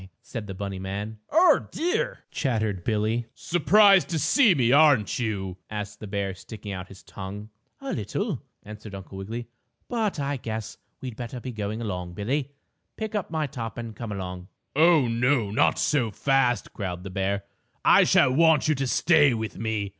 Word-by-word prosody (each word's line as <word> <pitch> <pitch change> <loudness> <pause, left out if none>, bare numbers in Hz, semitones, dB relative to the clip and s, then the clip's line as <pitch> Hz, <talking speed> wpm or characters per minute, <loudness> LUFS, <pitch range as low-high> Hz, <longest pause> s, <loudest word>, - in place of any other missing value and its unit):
said 115 -4 -6
the 95 - -5
bunny 100 -1 -5
man. 100 +3 -5
"Oh, 325 -1 +4
dear!" 350 +2 -1
chattered 110 - -1
Billie. 110 +2 0
"Surprised 190 -1 +5
to 165 - -1
see 210 - +4
me, 120 -4 +2
aren't 140 -8 +4
you?" 95 -6 -3
asked 105 -1 -5
the 105 - -7
bear 100 -1 -2
sticking 105 +3 -9
out 95 -1 -6
his 95 - -14
tongue. 100 +2 -8 0.3
"A 275 - -4
little," 135 - -3 0.2
answered 105 -1 -9
Uncle 95 0 -9
Wiggily, 115 +4 -5 0.4
"but 220 -8 -1
I 140 0 -1
guess 110 -3 -6 0.2
we'd 125 -4 -6
better 120 +2 -6
be 125 +1 -6
getting 110 0 -4
along 90 -5 -4
Billie. 130 +8 -1 0.5
Pick 220 0 -4
up 210 -4 -2
my 160 -1 -1
top 115 -5 -6
and 115 -2 -6
come 115 -3 -6
along." 90 -2 -6 0.3
"Oh, 160 -2 +5
oh! 120 -1 +1
Not 105 - +3
so 130 -7 +1
fast!" 130 +1 +1
growled 90 -3 -5
the 95 - -7
bear. 95 +1 -1 0.4
"I - - +7
shall 130 - +4
want 160 0 +4
you 155 - +4
to 135 -2 -2
stay 145 +1 +4
with 110 -1 -5
me. 110 -3 -2
115 Hz, 175 wpm, -26 LUFS, 100-140 Hz, 0.5 s, I